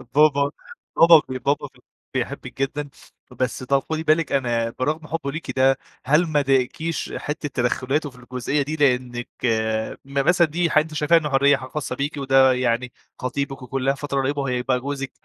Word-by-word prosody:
بابا 145 -1 +4 0.5
بابا 165 -1 +8
ب - - -3
بابا 145 +2 +1
ب 130 -2 -23 0.3
بيحبِك - - -4
جدًا، 145 +1 -2 0.4
بس 130 -1 -2
ت 130 +2 -4
خدي 155 +3 0
بالِك 160 0 +2
أنا 120 -4 0
برغم 150 +4 -1
حبه 155 -3 -3
ليكِ 160 +3 -5
ده، 135 0 +3 0.3
هل 150 +6 +4
ما 150 -2 +2
ضايقكيش 140 +4 -1
حتّة 150 0 -4
تدخلاته 130 +4 -1
في 125 - -18
الجزئية 125 +3 -2
دي؟ 145 +3 -3
لإنِك 125 -4 0 0.8
م 140 - -13
مثلًا 175 -1 +4
دي 170 +3 0
حاجة 155 0 +4
أنتِ 160 0 -11
شايفاها 155 +2 +4
إن 150 -2 -3
حرية 140 +1 +4
ح 130 - -8
خاصّة 135 -2 -4
بيكِ 140 +3 -3
وده 135 -1 +4
يعني 125 0 0 0.3
خطيبِك، 135 +1 -3
وكلّها 135 +1 -1
فترة 140 -1 -2
قريّبة 140 +2 -1
وهيبقى 125 -1 0
جوزِك، 135 0 -4
140 Hz, 175 wpm, -23 LUFS, 130-150 Hz, 0.8 s, بابا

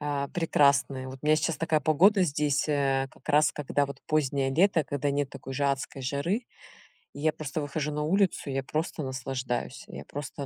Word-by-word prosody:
а, 145 -1 -1
прекрасные. 140 -5 +2
Вот 130 +1 -8
у 150 - -4
меня 155 - +5
сейчас 155 0 0
такая 160 -1 +1
погода 185 +7 +4
здесь, 150 -2 +1
э, 135 -2 +1
как - - -20
раз 150 +1 +4
когда 145 0 0
вот 140 - -9
позднее 140 -3 +1
лето, 170 +3 +3
когда 145 0 -1
нет 140 -1 -1
такой 135 - -8
же 140 +1 0
адской 135 0 -2
жары. 145 - -1 0.7
И - - -10
я 155 +1 +2
просто 155 0 -4
выхожу 150 +1 -2
на 150 0 -2
улицу, 185 -2 +1
я 135 0 -1
просто 155 +3 -3
наслаждаюсь. 130 -1 -3
Я - - -9
просто 140 0 -6
145 Hz, 190 wpm, -28 LUFS, 135-155 Hz, 0.7 s, меня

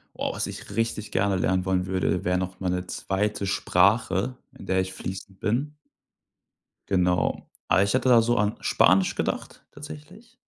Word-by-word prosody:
Boah. - - -2
Was - - -2
ich - - -8
richtig 115 -2 -2
gerne 100 0 +1
lernen 95 0 +1
wollen 95 -1 +1
würde, 95 -1 0
wäre 90 0 +1
noch 90 0 -4
mal 95 -2 -1
'ne 90 0 -1
2. 100 +1 -2
Sprache, 95 +4 +2 0.2
in - - -11
der 95 0 +1
ich 95 0 -5
fließend 95 +1 -7
bin. 135 +8 -1 1.1
Genau. 90 -2 +1 0.2
Aber 95 - +4
ich 100 - 0
hatte 130 0 +2
da 120 -2 +7
so 120 +1 +2
an 105 0 +1
Spanisch 95 +1 +4
gedacht - - -4
tatsächlich. 155 +10 -12
95 Hz, 165 wpm, -25 LUFS, 95-115 Hz, 1.1 s, da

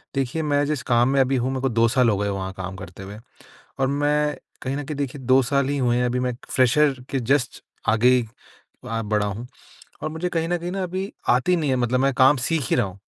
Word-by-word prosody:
देखिए, 135 +4 -1
मैं 145 -1 +1
जिस 150 -2 -2
काम 120 0 +3
में 135 0 +2
अभी 135 +1 +1
हूँ, 125 +1 0
मेरे 130 -1 -3
को 135 - +1
2 115 0 +3
साल 125 +1 +3
हो 105 - +1
गए 100 +1 -1
वहाँ 95 -1 -4
काम 95 0 -5
करते 90 +1 -10
हुए 100 +2 -9 0.6
और 135 - +2
मैं 145 +1 +1 0.3
कहीं 130 +1 -3
न 145 - -4
कहीं 150 0 -5
देखिए 140 -1 -4
2 130 +1 +4
साल 140 +1 +1
ही 145 - 0
हुए 120 -3 +1
हैं, 125 - +1
अभी 125 +1 0
मैं 125 0 0
एक 120 - -12
फ़्रेशर 135 +3 +3 0.2
के 135 - -1
जस्ट 130 +2 0 0.3
आगे 125 +3 +4 0.6
वहाँ 115 -2 -3
बढ़ा 105 -1 +1
हूँ 105 +4 -5 0.6
और 155 - -1
मुझे 160 +3 -3
कहीं 165 -1 -1
न 175 - +1
कहीं 175 +1 -4
न, - - -5
अभी 190 +1 -3 0.2
आती 125 +9 +3
नहीं 155 -4 -1
है, 130 - +2
मतलब 125 0 +1
मैं 135 +1 +2
काम 130 +3 +5
सीख 140 +1 -1
ही - - +4
रहा 120 - +2
हूँ 95 +1 -12
130 Hz, 250 wpm, -23 LUFS, 120-145 Hz, 0.6 s, काम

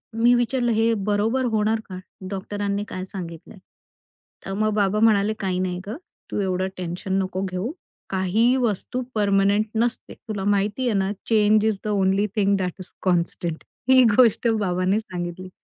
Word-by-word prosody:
मी 235 +2 +4
विचारलं, 240 0 +1
हे 225 +1 +3
बरोबर 225 +5 +1
होणार 220 +1 +1
का? 185 -1 -6 0.3
डॉक्टरांनी 200 +1 -3
काय 185 - -5
सांगितलयं? 180 0 -8 0.9
तर 195 - -4
मग 215 +2 +1
बाबा 205 0 +1
म्हणाले, 215 -1 +4
"काही 185 -2 -1
नाही 180 -1 -2
गं 220 - -4 0.4
तू - - -1
एवढं 185 0 0
टेन्शन 180 +1 -4
नको 185 0 -3
घेऊ. 185 +7 -3 0.4
काहीही 200 +7 +2
वस्तू 235 +3 -1
परमनेंट 200 0 +3
नसते. 230 +1 -1
तुला 210 -4 -6
माहिती 205 +5 +1
आहे 225 - +1
ना, 190 +1 0 0.2
change 215 -1 +4
is 220 -2 +1
the - - -4
only 195 0 +2
thing 200 -1 +3
that 180 -2 -2
is 185 - -10
constant." 170 -2 -1 0.3
ही 260 -1 +7
गोष्ट 235 -1 +4
बाबांनी 185 +1 +1
सांगितली. 180 -2 -6
205 Hz, 155 wpm, -23 LUFS, 185-220 Hz, 0.9 s, ही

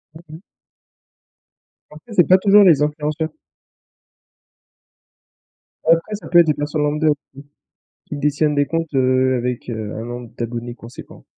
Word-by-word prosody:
Mmh 160 -1 -13
mh. 180 - -20 1.5
En 150 - -12
fait, 235 - -11
c'est 175 -5 +4
pas 185 - +6
toujours 205 +2 +5
les 160 -7 +5
influenceurs. 150 +1 -2 2.6
Après 165 +6 +2
ça 205 - -10
peut 175 - +6
être 170 - +6
des 150 - +3
personnes 150 +1 -2
lambda 150 +1 0
aussi. 145 -1 0 0.9
Qui - - -7
détiennent 150 +1 0
des 145 - +2
comptes, 165 -2 -3
heu, 130 0 +2
avec, 125 0 -4
heu, 110 -2 -5
un 110 +1 -6
nombre 120 -1 -8
d'abonnés 120 0 -5
conséquent. 120 0 -13
150 Hz, 145 wpm, -19 LUFS, 125-165 Hz, 2.6 s, pas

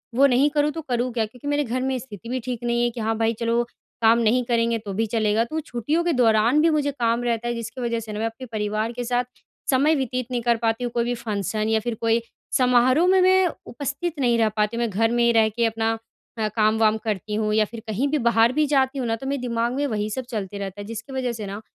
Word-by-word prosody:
वो 275 +3 +6
नहीं 270 +3 +3
करूँ, 295 0 +1
तो 325 +1 -5
करूँ 250 -3 -1
क्या? 230 -2 0
क्योंकि 250 +6 -11
मेरे 290 0 +1
घर 255 0 -2
में 265 0 0
स्थिति 230 -2 -10
भी 255 +1 -1
ठीक 245 -1 -4
नहीं 240 0 +1
है, 240 - +2
कि 240 0 -8
हाँ 220 0 -1
भाई 225 0 +1
चलो 235 0 +1 0.4
काम 225 +1 +5
नहीं 235 +2 +2
करेंगे 230 -1 +1
तो 210 -3 -6
भी 225 +3 0
चलेगा। 215 0 +1
तो, 310 +7 -3
छुट्टियों 300 +3 -1
के 345 - +1
दौरान 235 +2 +4
भी 330 - +4
मुझे 295 -2 +1
काम 235 -2 0
रहता 235 -1 -1
है 240 - 0
जिसकी 230 +3 -6
वज़ह 235 -1 -1
से 220 -1 -8
ना 210 - -4
मैं 225 - 0
अपने 225 +3 -5
परिवार 215 +1 -1
के 245 +1 -5
साथ 245 +1 0 0.5
समय 285 +4 +4
व्यतीत 255 -3 -2
नहीं 245 - -1
कर 235 0 +2
पाती 225 +1 -1
हूँ, 240 - -2
कोई 235 - +1
भी 240 +1 -1
फ़ंक्शन 215 -1 -2
या 220 0 +3
फिर 235 +1 -3
कोई 230 0 +2 0.4
समारोह 255 +5 +4
में 375 +1 +5
मैं 375 0 +5 0.2
उपस्थित 285 +5 -4
नहीं 240 -3 +3
रह 220 -1 +3
पाती 210 +2 +1
हूँ। 235 - 0
मैं 235 - 0
घर 225 +3 +1
में 240 0 +2
ही 235 - +4
रह 220 -1 +4
के 235 +2 0
अपना 225 0 0 0.5
अ, 220 - 0
काम-वाम 220 0 +3
करती 210 -1 -3
हूँ 215 0 0
या 215 0 +3
फिर 230 +2 -9
कहीं 220 +6 0
भी 300 +2 +1
बाहर 230 +1 +4
भी 305 - +4
जाती 265 0 +2
हूँ 245 - -2
ना, 225 - +1
तो 230 - -9
मेरे 275 -1 -2
दिमाग 235 0 -1
में 285 +1 0
वही 215 -3 -2
सब 260 +4 -4
चलते 205 -4 -4
रहता 200 0 -6
है - - -7
जिसकी 230 +4 -7
वज़ह 255 -2 -1
से - - -4
ना, 200 +2 -6
235 Hz, 265 wpm, -23 LUFS, 220-255 Hz, 0.5 s, वो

